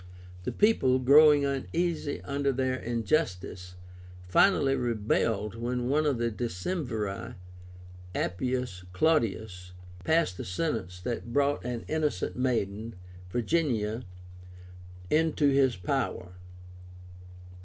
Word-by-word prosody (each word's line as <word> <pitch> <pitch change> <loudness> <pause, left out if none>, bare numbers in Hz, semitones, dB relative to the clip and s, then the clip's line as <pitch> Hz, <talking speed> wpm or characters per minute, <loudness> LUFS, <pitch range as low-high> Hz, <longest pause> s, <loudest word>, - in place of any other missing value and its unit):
The - - -1
people, 170 -12 +3
growing 145 +2 +6
uneasy 150 +3 -2
under 140 0 0
their 130 0 0
injustice, 115 - -2 0.5
finally 135 - +4
rebelled 110 -3 0
when 120 +2 -2
one 150 +2 +2
of 140 -4 +1
the 115 0 0
Decemviri, 110 - -3 0.8
Appius 125 -1 -2
Claudius, 110 - 0 0.3
passed 160 - +1
a - - -3
sentence 90 - -3
that 120 +3 -4
brought 140 +2 +1
an 120 -1 -4
innocent 155 -1 -1
maiden, 115 -3 -1 0.3
Virginia, 120 - 0 1.1
into 155 -2 +3
his 135 -3 +3
power. 90 0 -2
125 Hz, 95 wpm, -28 LUFS, 105-145 Hz, 1.1 s, growing